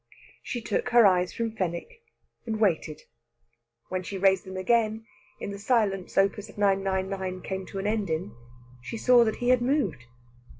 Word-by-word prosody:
She 240 Hz, -, -4 dB
took 245 Hz, -, -1 dB
her 240 Hz, -2 st, +6 dB
eyes 180 Hz, -2 st, +3 dB
from 230 Hz, +4 st, -3 dB
Fenwick, 190 Hz, -, -4 dB, 0.5 s
and 220 Hz, -1 st, -2 dB
waited. 165 Hz, -7 st, 0 dB, 0.9 s
When 185 Hz, 0 st, -2 dB
she 195 Hz, +2 st, -6 dB
raised 190 Hz, -1 st, +3 dB
them 190 Hz, 0 st, -7 dB
again, 220 Hz, +2 st, +1 dB, 0.3 s
in -, -, -5 dB
the 200 Hz, -, -7 dB
silence 205 Hz, -5 st, 0 dB
Op. 195 Hz, 0 st, +4 dB
999 195 Hz, -2 st, -1 dB
came 190 Hz, -1 st, -4 dB
to 195 Hz, -, -7 dB
an 195 Hz, -, -3 dB
end 210 Hz, -3 st, 0 dB
in, 155 Hz, -9 st, -3 dB, 0.5 s
she 225 Hz, -, -6 dB
saw 245 Hz, +1 st, +6 dB
that 220 Hz, -1 st, 0 dB
he 245 Hz, -, -1 dB
had 255 Hz, -1 st, +4 dB
moved. 240 Hz, -, 0 dB
195 Hz, 165 wpm, -27 LUFS, 185-225 Hz, 0.9 s, her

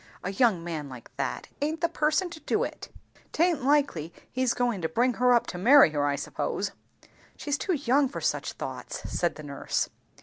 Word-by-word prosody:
A 190 Hz, -, -2 dB
young 200 Hz, -5 st, +2 dB
man 155 Hz, -4 st, -4 dB
like 125 Hz, -3 st, -12 dB
that, -, -, -3 dB
aint 315 Hz, +3 st, -1 dB
the 335 Hz, -, +3 dB
person 310 Hz, +4 st, +1 dB
to 330 Hz, -, -8 dB
do -, -, 0 dB
it -, -, -6 dB, 0.4 s
Taint 330 Hz, -4 st, +2 dB
likely 270 Hz, -, +2 dB, 0.2 s
he's 255 Hz, -1 st, +1 dB
goin' 240 Hz, -6 st, 0 dB
to 160 Hz, -, -1 dB
bring 245 Hz, +8 st, +2 dB
her 250 Hz, 0 st, +5 dB
up 240 Hz, -1 st, +4 dB
to 180 Hz, -, -5 dB
marry 260 Hz, -, +7 dB
her, 145 Hz, -1 st, +1 dB
I 140 Hz, -, +1 dB
suppose." -, -, -3 dB, 0.7 s
"She's 290 Hz, -1 st, -2 dB
too 375 Hz, -, 0 dB
young 275 Hz, -1 st, +2 dB
for -, -, -7 dB
such -, -, -1 dB
thoughts," -, -, -6 dB
said 175 Hz, -, 0 dB
the 155 Hz, -, -9 dB
nurse. 140 Hz, -1 st, -2 dB
245 Hz, 195 wpm, -27 LUFS, -, 0.7 s, marry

